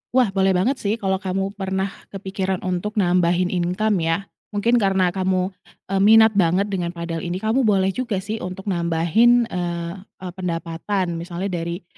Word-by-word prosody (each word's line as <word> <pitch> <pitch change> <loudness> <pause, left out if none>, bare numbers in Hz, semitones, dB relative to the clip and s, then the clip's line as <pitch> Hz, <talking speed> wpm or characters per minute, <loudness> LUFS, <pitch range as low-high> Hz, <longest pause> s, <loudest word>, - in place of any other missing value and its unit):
Wah, 250 -6 +4
boleh 190 -1 +2
banget 250 +10 +1
sih 205 +2 0
kalau 190 -3 -1
kamu 195 0 -2
pernah 190 -1 -2 0.2
kepikiran 190 -1 -3
untuk 185 +4 -2
nambahin 180 -2 +2
income 185 +3 0
ya, 165 +4 0 0.3
mungkin 235 +4 +3
karena 190 -3 +2
kamu, 185 0 0 0.4
eee, 195 - +1
minat 220 +2 +7
banget 195 +1 +2
dengan 175 -2 -2
padel 170 -1 -4
ini, 175 +2 -4
kamu 230 +3 +2
boleh 195 -2 +3
juga 210 -4 -3
sih 215 +2 -4
untuk 190 +2 -5
nambahin 180 +8 +3
eee, 170 -1 -3
e 185 - -14
pendapatan 170 0 -3
misalnya 180 +3 -4
dari 170 +1 -4
190 Hz, 160 wpm, -22 LUFS, 175-200 Hz, 0.4 s, minat